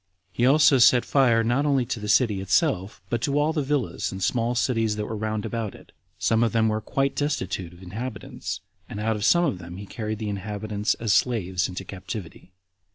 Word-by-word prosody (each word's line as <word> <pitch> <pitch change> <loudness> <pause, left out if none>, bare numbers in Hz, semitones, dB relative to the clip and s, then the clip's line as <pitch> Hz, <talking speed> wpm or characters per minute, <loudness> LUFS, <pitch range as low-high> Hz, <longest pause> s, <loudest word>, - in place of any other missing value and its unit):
He 120 +6 +2
also 140 -1 +6
set 120 0 +6
fire 120 -5 +3
not 120 +5 +1
only 140 -4 +2
to 120 - -3
the 105 - -5
city 105 -3 +3
itself, 105 - 0
but 120 -1 0
to 140 +3 0
all 150 +2 +2
the 155 - 0
villas 140 -3 -1
and 95 0 -5
small 120 +3 +1
cities 115 -3 +1
that 105 0 -3
were 110 - -4
round 110 0 -2
about 115 -3 -3
it; - - -16 0.3
some 115 0 +2
of 115 - +1
them 110 -1 +3
were 110 0 -1
quite 135 +4 -1
destitute 95 - -2
of 90 +1 -15
inhabitants, 110 +5 -6 0.3
and 105 - -6
out 110 +1 0
of 105 - -4
some 175 +9 +4
of 130 - -1
them 85 0 -9
he 100 - -7
carried 110 0 -4
the 110 0 -4
inhabitants 105 +1 -2
as 115 -3 0
slaves 95 -6 +1
into 95 +1 -6
captivity. 95 -1 -8
110 Hz, 210 wpm, -25 LUFS, 100-125 Hz, 0.3 s, also